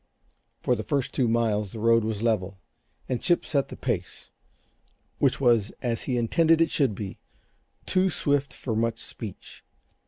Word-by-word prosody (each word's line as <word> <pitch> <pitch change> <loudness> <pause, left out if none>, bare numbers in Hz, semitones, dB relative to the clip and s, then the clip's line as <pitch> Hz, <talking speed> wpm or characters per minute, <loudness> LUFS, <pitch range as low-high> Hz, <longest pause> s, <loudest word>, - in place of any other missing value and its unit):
For - - +2
the - - -3
first 140 -3 -1
two 125 - +2
miles 110 -3 +1
the 115 - -6
road 115 +1 +4
was 110 -1 -2
level, 100 -5 0 0.5
and 125 - -2
Chip 175 - +2
set 140 -3 0
the - - -7
pace - - -4 0.9
which - - +2
was, 120 -6 +3
as 115 -2 -1
he 125 - 0
intended 160 +8 +3
it 165 -1 +3
should 135 -9 +2
be, 100 -1 -6 0.7
too 190 0 +2
swift 145 -4 0
for 115 -4 -4
much 115 +1 0
speech. 110 -6 -10
115 Hz, 160 wpm, -26 LUFS, 110-140 Hz, 0.9 s, road